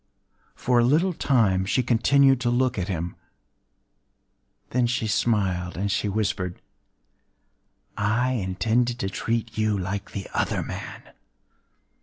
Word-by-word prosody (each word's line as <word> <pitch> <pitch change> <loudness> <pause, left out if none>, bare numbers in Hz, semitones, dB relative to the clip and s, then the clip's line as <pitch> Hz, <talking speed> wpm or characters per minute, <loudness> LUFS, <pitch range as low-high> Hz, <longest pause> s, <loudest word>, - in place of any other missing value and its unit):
For 125 -1 +2
a - - +4
little 160 +9 +3
time 110 - +2
she 115 +6 +1
continued 135 +2 +4
to 120 - +1
look 125 -1 +1
at 90 - -2
him;—then 90 - -7
she 125 -1 -1
smiled, 95 -5 0
and 100 +2 -1
she 100 +1 0
whispered:—“I 105 - -5
intended 115 +3 0
to 95 - -2
treat 115 +2 -2
you 110 -1 +1
like 100 +1 -4
the 100 -2 -6
other - - 0
man. - - -8
110 Hz, 115 wpm, -25 LUFS, 95-125 Hz, -, a